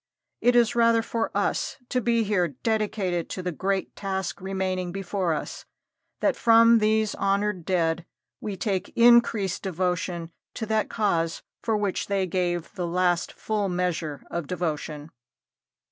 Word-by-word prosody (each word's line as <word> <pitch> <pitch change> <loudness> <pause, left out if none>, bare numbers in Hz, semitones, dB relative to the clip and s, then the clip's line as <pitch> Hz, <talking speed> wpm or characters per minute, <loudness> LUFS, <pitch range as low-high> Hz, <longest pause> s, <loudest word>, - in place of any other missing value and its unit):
It 245 0 +4
is 240 -1 +4
rather 230 -1 +4
for 230 0 -2
us - - -1
to 250 - 0
be 235 0 +2
here 200 -4 +1
dedicated 190 - -1
to 185 - -5
the 180 - -1
great 190 +4 -2
task 190 -3 -3
remaining 185 -1 -2
before 190 -1 -2
us - - -6 0.6
that - - +2
from 230 0 +6
these 215 0 +2
honored 195 -2 0
dead 170 -2 0 0.3
we 205 -3 -5
take 195 -1 -2
increased 235 -5 +4
devotion 180 -2 -2 0.2
to 225 - -3
that 220 0 0
cause 170 -7 0 0.2
for 225 -2 0
which 205 -2 -1
they 195 -1 +1
gave 175 -2 -2
the 175 -1 -3
last 175 0 +1
full 210 -2 -2
measure 170 -5 -2
of 170 -4 -3
devotion. 155 -3 -3
190 Hz, 145 wpm, -26 LUFS, 175-215 Hz, 0.6 s, from